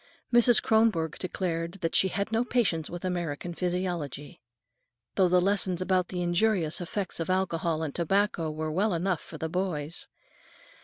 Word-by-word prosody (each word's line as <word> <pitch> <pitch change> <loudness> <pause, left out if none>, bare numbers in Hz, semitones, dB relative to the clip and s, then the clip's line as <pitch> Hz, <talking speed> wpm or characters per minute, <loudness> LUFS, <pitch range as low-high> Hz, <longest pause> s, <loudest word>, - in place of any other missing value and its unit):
Mrs. 240 0 +6
Kronborg 215 -8 +2
declared 170 -2 -2
that 165 - -1
she 190 - +4
"had 200 +3 -2
no 225 +1 +2
patience 195 -11 0
with 175 +1 -6
American 175 -2 -3
physiology," 175 -5 -3 0.7
though 185 -2 +3
the 180 +1 +5
lessons 190 -1 +1
about 185 -1 +1
the 180 -1 -3
injurious 175 -2 +1
effects 185 +1 -4
of 165 - -3
alcohol 170 -3 0
and 150 -3 -3
tobacco 175 -1 +1
were 155 0 -3
well 190 +4 +1
enough 175 0 0
for 160 - -10
the 160 - -3
boys. 165 -3 -2
180 Hz, 155 wpm, -28 LUFS, 165-190 Hz, 0.7 s, Mrs